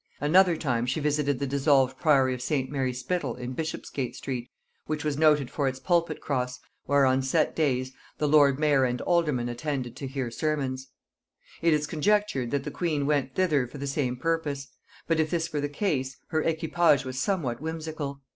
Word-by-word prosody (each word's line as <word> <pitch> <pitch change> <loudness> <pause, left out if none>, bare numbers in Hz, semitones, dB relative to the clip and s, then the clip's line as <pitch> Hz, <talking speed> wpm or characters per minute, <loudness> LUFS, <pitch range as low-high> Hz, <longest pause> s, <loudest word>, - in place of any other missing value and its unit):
Another 175 +3 +4
time 120 -6 -1
she 130 +5 0
visited 145 -2 +1
the 140 - -2
dissolved 135 -1 +2
priory 135 -5 +4
of 125 - -6
St. 130 0 -1
Mary 135 -3 0
Spittle 130 +1 -2
in 125 +1 -6
Bishopsgate 135 -4 -4
street, 125 -3 -5 0.4
which 155 -1 -2
was 150 -2 0
noted 150 -3 +3
for 140 -2 0
its 130 0 -2
pulpit 170 -2 +1
cross, 125 -2 -2 0.3
where, 140 0 +4
on 130 0 +3
set 140 +4 +1
days, 130 -4 0 0.2
the 150 - 0
lord 145 -2 +5
mayor 145 -3 +3
and 125 -1 0
aldermen 150 -9 +1
attended 125 0 -3
to 135 - -5
hear 130 -3 -3
sermons. 135 -2 -2 0.7
It 165 - +4
is 150 -1 +2
conjectured 160 - +1
that 140 +1 -1
the - - -5
queen 155 -5 -1
went 140 -3 0
thither 155 -9 +2
for 135 - -10
the 140 - -4
same 135 -3 -1
purpose; 145 -3 -2 0.4
but 165 -1 +1
if 155 -1 +2
this 165 -1 -2
were 145 - 0
the 145 - -2
case, 140 -6 -1
her 155 -2 +1
equipage 160 -3 +2
was 130 0 -4
somewhat 140 - -1
whimsical. 155 -3 -5
140 Hz, 185 wpm, -27 LUFS, 130-155 Hz, 0.7 s, lord